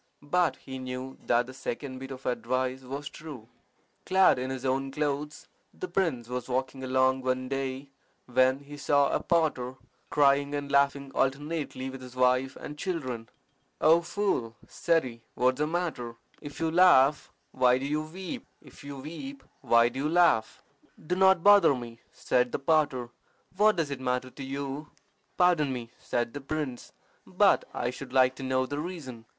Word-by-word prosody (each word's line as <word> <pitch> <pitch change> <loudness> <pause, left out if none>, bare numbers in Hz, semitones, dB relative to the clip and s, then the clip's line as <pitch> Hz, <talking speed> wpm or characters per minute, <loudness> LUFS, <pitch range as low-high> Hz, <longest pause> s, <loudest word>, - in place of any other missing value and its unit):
But 175 +3 +1
he 130 -1 -8
knew 130 +1 -6
that 120 0 +3
the 130 - -10
second 130 0 -5
bit 135 0 -8
of 135 -1 -9
advice 130 +1 -1
was 135 +3 -6
true. 145 -8 -10 0.6
Clad 190 -7 +4
in 130 +1 -3
his 130 0 -5
own 135 +1 0
clothes, 150 +1 -3 0.3
the 370 - -5
prince 160 - -1
was 125 0 -5
walking 130 +1 -2
along 130 0 +2
one 130 0 -1
day 135 +1 -4 0.3
when 130 +2 +2
he 145 +1 -11
saw 145 -1 +2
a - - +1
potter 150 -7 0 0.3
crying 140 0 +3
and 145 -1 -4
laughing 140 0 +2
alternately 140 0 -1
with 135 0 -9
his 125 0 -11
wife 130 +1 +2
and 150 0 -9
children. 130 - -4 0.5
"O 165 +2 +5
fool," 170 - -1
said 165 -1 +1
he, 115 -2 -8
"what 130 +1 +3
is 130 - -13
the 150 - +1
matter? 155 -9 -3 0.3
If 145 0 -9
you 165 -1 0
laugh, 155 -5 +5 0.2
why 125 -1 +4
do 135 - -4
you 150 +2 0
weep? 185 - -7
If - - -16
you 140 -1 -7
weep, 270 - -8 0.2
why 115 0 +4
do 125 - -7
you 150 +2 0
laugh?" 165 -10 +3 0.4
"Do 180 - 0
not 190 -2 +4
bother 205 -8 +7
me," 120 -2 -8
said 125 -1 0
the - - -1
potter. 140 -5 +1 0.4
"What 210 +2 +4
does 160 -5 -1
it 135 -2 -5
matter 125 0 -1
to 135 - -9
you?" 140 +2 -5 0.5
"Pardon 170 -6 +3
me," 120 -2 -6
said 120 -1 -2
the 145 - -6
prince, 140 -3 -4 0.4
"but - - +3
I 120 0 -2
should 130 0 -9
like 130 -1 +4
to - - -8
know 130 0 +1
the 145 +2 -4
reason." 145 -9 -7
135 Hz, 175 wpm, -28 LUFS, 130-155 Hz, 0.6 s, bother